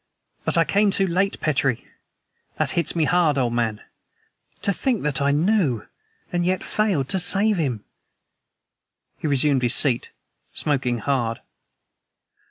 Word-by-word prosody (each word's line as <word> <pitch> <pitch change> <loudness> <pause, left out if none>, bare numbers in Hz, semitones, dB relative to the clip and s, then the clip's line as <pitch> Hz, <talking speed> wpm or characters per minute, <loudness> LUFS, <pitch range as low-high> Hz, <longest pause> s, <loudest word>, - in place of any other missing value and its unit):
But - - +1
I 165 - +5
came 205 +5 +2
too 195 0 +2
late, 190 +2 0
Petrie! 135 -5 0 0.7
That - - 0
hits 170 - -1
me 165 - +2
hard, 160 -3 +2
old 120 -3 0
man. 115 -3 -1 0.8
To 200 - +1
think 245 +2 -1
that 145 -2 -1
I 140 - +2
knew 150 - +1 0.5
and 175 0 +1
yet 185 +1 0
failed 195 -11 0
to 190 - +1
save 200 +3 +2
him!" 130 -10 -2 1.4
He - - -3
resumed 140 -1 +2
his 120 0 +4
seat, 125 -5 +3 0.5
smoking 130 -5 0
hard. 120 -1 -1
150 Hz, 140 wpm, -23 LUFS, 130-185 Hz, 1.4 s, I